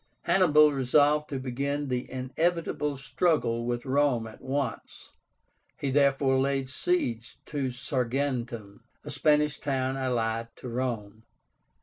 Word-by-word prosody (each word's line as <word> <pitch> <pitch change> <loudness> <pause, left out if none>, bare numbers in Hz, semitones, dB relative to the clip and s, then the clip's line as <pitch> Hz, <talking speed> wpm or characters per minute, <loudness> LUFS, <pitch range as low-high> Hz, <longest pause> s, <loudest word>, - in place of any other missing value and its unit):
Hannibal 150 -5 +5
resolved 145 +3 +3
to 140 - -3
begin 140 +3 -2
the 125 -1 -2
inevitable 150 +2 -1
struggle 135 -6 0
with 120 +1 -2
Rome 135 -3 +2
at 110 -1 -11
once. 135 -2 -4 0.7
He 140 - -2
therefore 135 -1 +3
laid 135 -1 0
siege 125 -6 -1
to 140 -3 -2
Saguntum, 125 -4 -2 0.2
a - - -7
Spanish 150 -1 +2
town 135 -2 -1
allied 115 -3 -1
to 125 - -8
Rome. 115 -4 -3
135 Hz, 115 wpm, -28 LUFS, 120-145 Hz, 0.7 s, Hannibal